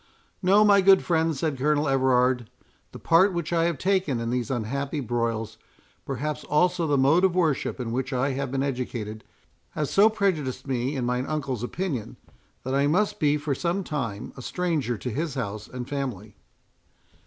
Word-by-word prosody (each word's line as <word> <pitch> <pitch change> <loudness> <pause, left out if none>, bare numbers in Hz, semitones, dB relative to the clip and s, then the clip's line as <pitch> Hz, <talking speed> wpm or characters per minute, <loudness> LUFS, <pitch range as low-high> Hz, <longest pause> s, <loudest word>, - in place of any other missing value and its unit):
"No, 200 +3 +5
my 200 -1 +6
good 190 0 +6
friend," 160 -3 +1
said 150 -2 -2
Colonel 150 +2 +2
Everard; 130 -3 +2 0.4
"the - - -9
part 185 +4 +4
which 170 -1 -3
I 165 -1 +3
have 170 -3 0
taken 185 -7 0
in 115 0 -2
these 125 -2 -1
unhappy 135 +5 -2
broils, 115 -3 -2 0.5
perhaps 140 +3 -3
also 175 +2 +2
the 145 -1 +2
mode 145 +7 +4
of 185 -2 +3
worship 160 -7 0
in 120 -2 -3
which 130 +3 -2
I 135 +2 0
have 135 -1 -3
been 135 0 0
educated, 120 -5 -4 0.5
have 150 -2 -2
so 205 +3 +5
prejudiced 185 - -1
me 130 +1 -1
in 130 -3 -2
mine 125 +2 -1
uncle's 140 -6 -3
opinion, 135 - -4 0.5
that 130 - -3
I 140 +1 +3
must 205 +6 +1
be 150 -1 +3
for 145 -1 -2
some 175 +7 -1
time 120 - -4
a 130 - -9
stranger 155 -6 -1
to 125 - -5
his 150 +4 -3
house 105 -4 -4
and 125 -1 -7
family." 120 -8 -5
140 Hz, 175 wpm, -25 LUFS, 125-165 Hz, 0.5 s, my